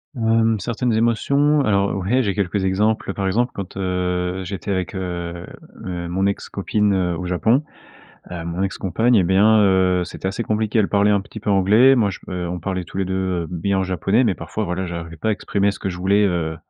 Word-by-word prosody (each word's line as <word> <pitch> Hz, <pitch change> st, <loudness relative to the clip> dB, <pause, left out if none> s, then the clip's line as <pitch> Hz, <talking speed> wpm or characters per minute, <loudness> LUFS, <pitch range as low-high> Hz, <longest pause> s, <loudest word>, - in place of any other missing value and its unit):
Hem, 115 Hz, -2 st, +2 dB
certaines 120 Hz, +3 st, -1 dB
émotions, 140 Hz, +6 st, +2 dB
alors, 100 Hz, -1 st, +1 dB
ouais, 105 Hz, +8 st, +1 dB
j'ai 100 Hz, -5 st, -1 dB
quelques 100 Hz, -1 st, -1 dB
exemples. 100 Hz, +1 st, 0 dB
Par 100 Hz, -, -2 dB
exemple, 120 Hz, +6 st, +1 dB
quand, 100 Hz, -1 st, -7 dB
heu, 90 Hz, 0 st, -2 dB
j'étais 95 Hz, +1 st, -6 dB
avec, 95 Hz, 0 st, -2 dB
heu 85 Hz, -2 st, -5 dB, 0.4 s
heu, 90 Hz, -2 st, -4 dB
mon 95 Hz, +3 st, 0 dB
ex-copine, 100 Hz, +1 st, -1 dB
heu, 90 Hz, -3 st, 0 dB
au 90 Hz, -, -5 dB
Japon, 110 Hz, -, +2 dB, 0.7 s
heu, 85 Hz, -2 st, -6 dB
mon 85 Hz, +3 st, -2 dB
ex-compagne, 100 Hz, +5 st, +1 dB
eh 95 Hz, -, +4 dB
bien, 105 Hz, +4 st, +4 dB
heu, 95 Hz, -2 st, +3 dB
c'était 95 Hz, -, -5 dB
assez 115 Hz, +4 st, -3 dB
compliqué, 110 Hz, +1 st, 0 dB
elle 100 Hz, -, +2 dB
parlait 100 Hz, 0 st, +3 dB
un 100 Hz, -, +3 dB
petit 105 Hz, +2 st, -10 dB
peu 105 Hz, -, -3 dB
anglais, 105 Hz, +7 st, +5 dB
moi, 110 Hz, -5 st, +2 dB
je -, -, -7 dB
p -, -, -12 dB
heu, 90 Hz, -1 st, -3 dB
on 90 Hz, -, -4 dB
parlait 95 Hz, -2 st, -3 dB
tous 95 Hz, -, -9 dB
les 95 Hz, -, +1 dB
2, 95 Hz, -, -3 dB, 0.3 s
heu, -, -, -7 dB
bien 95 Hz, +2 st, -1 dB
japonais, 95 Hz, +6 st, +1 dB
mais 105 Hz, -, +2 dB
parfois, 110 Hz, -, -5 dB
voilà, 95 Hz, 0 st, -3 dB
j'arrivais 85 Hz, -1 st, -7 dB
pas -, -, -3 dB
à 110 Hz, -, +3 dB
exprimer 100 Hz, -1 st, 0 dB
ce -, -, -10 dB
que 95 Hz, -, -3 dB
je 90 Hz, -, -6 dB
voulais, 100 Hz, +3 st, +2 dB
heu, 85 Hz, -4 st, -1 dB
95 Hz, 215 wpm, -21 LUFS, 90-110 Hz, 0.7 s, anglais